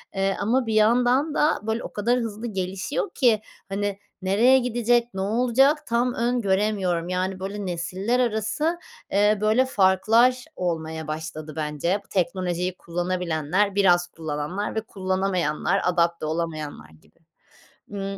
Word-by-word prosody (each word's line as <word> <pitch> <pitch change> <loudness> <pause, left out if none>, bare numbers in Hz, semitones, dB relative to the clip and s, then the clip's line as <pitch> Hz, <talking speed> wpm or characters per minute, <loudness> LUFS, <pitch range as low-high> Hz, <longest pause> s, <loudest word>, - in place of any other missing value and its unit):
eee, 195 0 +1
ama 245 +4 +1
bir 220 - -2
yandan 245 +7 +3
da, 300 - +2
böyle, 220 +2 -2
o - - -8
kadar 235 +4 +1
hızlı 225 0 -4
gelişiyor 195 - -3
ki, 235 -6 +3 0.3
hani, 200 0 -2 0.2
nereye 230 +8 +4
gidecek, 240 0 +1
ne 190 - -3
olacak, 250 +8 +2
tam 240 +1 +1
öngöremiyorum. 200 -7 0
Yani, 185 +1 -2
böyle, 200 +1 -5
nesiller 185 +7 -1
arası, 250 - 0 0.3
eee, 210 +1 +3
böyle, 220 +5 +3
farklar 225 +4 +3
olmaya 160 -3 -3
başladı, 155 0 -6
bence. 155 +5 -1
Teknolojiyi 180 -1 -1
kullanabilenler, 175 +2 -1
biraz 175 -3 +4
kullananlar 160 +5 -4
ve 220 - 0
kullanamayanlar, 185 -3 -1
adapte 170 -2 +1
olamayanlar 155 - -4
gibi. 80 - -23 0.7
Imm, 195 -1 -5
195 Hz, 125 wpm, -24 LUFS, 175-230 Hz, 0.7 s, nereye